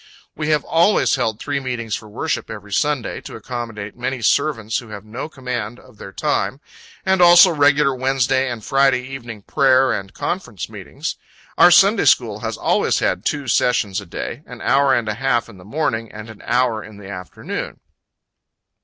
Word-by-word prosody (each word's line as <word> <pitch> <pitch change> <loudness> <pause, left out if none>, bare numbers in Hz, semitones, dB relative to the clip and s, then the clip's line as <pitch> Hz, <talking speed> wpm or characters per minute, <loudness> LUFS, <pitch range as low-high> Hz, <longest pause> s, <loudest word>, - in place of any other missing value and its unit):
We 155 0 -3
have 150 -2 +2
always 170 +6 +3
held 115 -4 0
three 145 -1 -2
meetings 120 -5 -3
for 110 - -9
worship 120 +2 -3
every 105 -1 -8
Sunday, 145 -2 -1
to - - -9
accommodate 115 -3 -6
many 125 0 -4
servants, 115 -2 +1
who 120 - -12
have 105 -1 -9
no 120 +8 -6
command 125 -5 -5
of 125 -5 -19
their 95 - -9
time, 145 +1 -1 0.5
and 190 -1 +2
also 175 +1 +8
regular 145 -2 +3
Wednesday 130 0 +1
and 120 -3 -6
Friday 135 -2 +3
evening 120 -5 -8
prayer 130 -1 +3
and 95 -1 -5
conference 125 - -4
meetings. - - -6 0.4
Our - - +7
Sunday - - +5
school - - +3
has - - -4
always - - +1
had - - 0
two 145 -3 -2
sessions 110 -4 +1
a 100 - -13
day - - -6
an - - -10
hour 140 0 +3
and 120 -4 +1
a 105 - 0
half 120 0 0
in 105 -5 -14
the 90 - -14
morning, 115 -3 -2
and 110 +1 -9
an 110 - -14
hour 120 -3 +1
in 110 -2 -12
the 100 -2 -11
afternoon. 90 -2 -6
125 Hz, 180 wpm, -20 LUFS, 110-140 Hz, 0.5 s, also